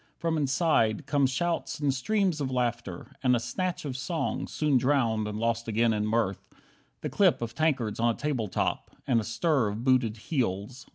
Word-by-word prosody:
From 165 -1 -1
inside 135 -5 +2
Come 140 -1 +2
shouts 170 +6 -2
and 145 -2 +1
streams 185 +3 0
of 135 - -1
laughter, 120 -3 -2
and 125 -2 +4
a - - +1
snatch 165 +10 -3
Of 135 -3 -4
song, 130 +6 -2
soon 150 -4 +1
drowned 120 -5 +1
and 105 0 -4
lost 115 +1 -1
again 115 +1 +2
in 105 0 -1
mirth, 110 -3 0 0.6
The - - -3
clip - - +3
of 115 -1 -4
tankards 135 -9 0
on 115 0 +2
a - - -17
table 135 -7 -1
top, - - -2 0.2
And 115 -4 +2
stir 120 +3 +1
of 105 +3 -4
booted 125 -4 +2
heels. 120 - -3
125 Hz, 180 wpm, -28 LUFS, 115-145 Hz, 0.6 s, and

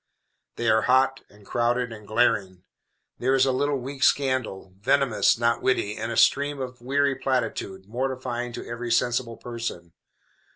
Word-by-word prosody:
They 120 - -2
are 110 0 +4
hot, 135 +1 +3
and 100 0 -19
crowded, 120 +2 0
and 105 -2 -12
glaring. 100 -5 +1 0.6
There 130 +2 +2
is 135 0 +4
a 135 - +2
little 145 +2 0
weak 135 +2 -7
scandal, 130 -11 +1
venomous, 130 +1 +3
not 120 0 +1
witty, 105 -5 0
and 115 +1 -4
a 115 - -3
stream 145 0 +3
of 125 -2 -6
weary 140 +2 +1
platitude, 115 -7 -2
mortifying 125 +1 -3
to - - -7
every 120 0 -5
sensible 120 0 +1
person. 115 -8 -6
120 Hz, 155 wpm, -25 LUFS, 115-130 Hz, 0.6 s, are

